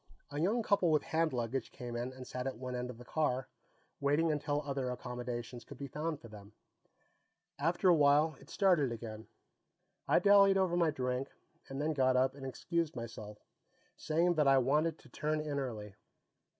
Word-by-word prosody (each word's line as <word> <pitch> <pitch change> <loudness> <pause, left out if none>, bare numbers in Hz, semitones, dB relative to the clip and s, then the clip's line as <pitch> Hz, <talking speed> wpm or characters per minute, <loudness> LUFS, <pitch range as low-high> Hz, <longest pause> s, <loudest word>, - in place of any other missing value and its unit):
A 145 - -3
young 220 +7 +1
couple 200 -5 +3
with 155 -2 +3
hand 160 0 +1
luggage 120 0 -2
came 120 -3 -7
in 120 +2 -3
and 130 0 -10
sat 125 +1 -4
at 130 - -4
one 125 +1 -5
end 125 0 -3
of 125 - -8
the 125 - -12
car, 130 -3 0 0.5
waiting 150 +4 +2
until 150 0 -1
other 135 -3 -2
accommodations 125 -1 -5
could 140 - -11
be 140 - -5
found 150 +3 -3
for 115 - -12
them. 105 -1 -13 1.1
After 170 +6 +1
a 180 - +8
while, 150 0 +4
it 140 - -17
started 175 - +3
again. 110 -1 -7 0.8
I - - +4
dallied 200 -1 +6
over 185 -2 +2
my 170 -2 +3
drink, 130 -2 -2 0.4
and 135 0 -5
then 155 +2 0
got 130 -3 +3
up 130 +1 +3
and 135 -1 -7
excused 165 +3 -2
myself, 110 -3 -7 0.6
saying 170 +3 +1
that 150 -2 +4
I 135 0 +6
wanted 150 +5 +2
to 135 - -18
turn 155 +4 -1
in 150 -2 -2
early. 110 -6 -5
140 Hz, 185 wpm, -33 LUFS, 125-155 Hz, 1.1 s, a